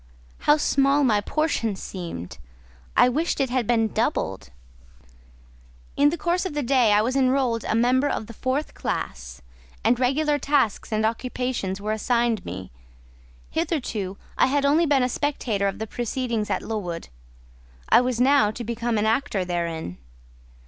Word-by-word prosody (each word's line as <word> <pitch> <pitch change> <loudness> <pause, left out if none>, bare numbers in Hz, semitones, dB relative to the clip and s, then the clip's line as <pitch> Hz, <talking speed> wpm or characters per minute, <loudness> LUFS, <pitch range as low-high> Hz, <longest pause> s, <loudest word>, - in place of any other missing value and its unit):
How 295 - +7
small 275 -1 +3
my 215 -6 +3
portion 230 -5 -1
seemed! 165 - -7 0.6
I - - +7
wished 305 +7 0
it 265 -3 0
had 250 -4 0
been 225 -2 +3
doubled. 65 - -1 1.5
In 285 +1 +5
the 335 - -3
course 345 +2 0
of 370 -6 -4
the 295 - -1
day 250 -3 +3
I 210 +1 +4
was 255 +4 -1
enrolled 255 -3 +2
a - - 0
member 255 +5 +3
of - - -2
the 230 - -10
fourth 260 +6 -2
class, - - -5 0.4
and 245 - +3
regular 290 +3 +1
tasks 275 -10 +1
and 215 0 +1
occupations 235 -4 -2
were 210 +1 -3
assigned 235 -1 +1
me: 95 +1 -7 0.8
hitherto, 245 - -2 0.2
I - - +5
had 280 +1 +1
only 315 +4 +4
been 280 -3 +3
a - - +2
spectator 245 -7 -1
of 195 - -3
the 220 - -3
proceedings 235 -1 -2
at - - -1
Lowood; 180 -7 -4 0.8
I - - +7
was 250 -2 -1
now 270 -3 +5
to 225 +3 -6
become 235 0 -2
an 210 - +1
actor 220 -4 0
therein. 170 - -3
240 Hz, 155 wpm, -24 LUFS, 210-275 Hz, 1.5 s, How